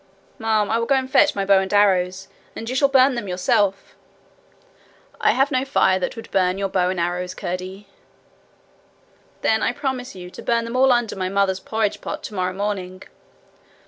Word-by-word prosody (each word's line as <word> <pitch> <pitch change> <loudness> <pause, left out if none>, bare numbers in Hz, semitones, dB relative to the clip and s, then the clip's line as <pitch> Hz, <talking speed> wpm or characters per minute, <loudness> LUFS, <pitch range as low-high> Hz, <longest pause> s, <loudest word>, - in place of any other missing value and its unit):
'Ma'am, 220 -2 +1
I 225 - +2
will 230 - -2
go 275 - +3
and 260 -1 0
fetch 275 - +4
my 195 -1 -1
bow 195 -1 +5
and 190 0 -3
arrows, 190 -2 +2 0.3
and 225 - -7
you 255 - -3
shall 280 +1 +4
burn 270 0 +4
them 235 -4 -4
yourself.' 190 +2 0 1.3
'I - - +3
have 270 +1 +1
no 255 0 +1
fire 190 -9 +2
that 185 - -3
would 225 - -10
burn 185 -1 +1
your 195 0 -2
bow 180 -1 +1
and 185 -1 -2
arrows, 180 +1 -2
Curdie.' 185 +3 -6 1.6
'Then 220 0 +2
I - - 0
promise 265 -4 -4
you 180 -1 -9
to - - -10
burn 230 -1 0
them 230 +2 -6
all 260 +1 +4
under 240 -3 +1
my 185 -1 -2
mother's 195 -1 +1
porridge 220 0 -2
pot - - -6
tomorrow 185 -3 -2
morning.' 190 -2 -4
200 Hz, 185 wpm, -22 LUFS, 185-235 Hz, 1.6 s, bow